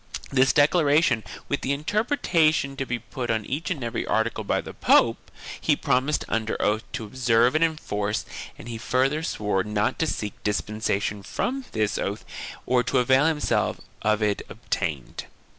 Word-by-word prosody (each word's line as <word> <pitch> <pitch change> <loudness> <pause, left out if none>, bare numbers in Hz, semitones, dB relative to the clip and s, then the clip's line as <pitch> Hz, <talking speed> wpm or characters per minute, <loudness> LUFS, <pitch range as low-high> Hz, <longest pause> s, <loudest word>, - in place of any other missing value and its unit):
This 135 0 +4
declaration, 145 -5 +4 0.2
with 140 - -1
the 135 - 0
interpretation 160 - +1
to 135 -1 -3
be 120 - -1
put 120 +2 -6
on 110 -2 0
each 145 +3 -3
and 155 -9 -2
every 115 - -2
article 110 0 0
by - - 0
the - - -7
pope, - - +3 0.3
he - - +3
promised 135 +4 +1
under 110 0 -1
oath 105 +1 +1
to 120 -3 -3
observe 120 +1 +3
and 155 +1 +3
enforce 105 -10 -1 0.3
and - - -11
he 115 -2 -5
further 135 +6 +1
swore 105 - -1
not 105 0 -1
to 160 - +1
seek 105 -7 -4
dispensation 105 -1 -1
from 260 - -3
this 110 -2 0
oath 100 +2 -3 0.4
or 125 -1 +3
to 125 +2 0
avail 130 +4 +4
himself 155 -2 0 0.2
of 110 0 +2
it 105 -1 +1
if - - -16
obtained. 70 -5 -4
125 Hz, 165 wpm, -25 LUFS, 110-150 Hz, 0.4 s, This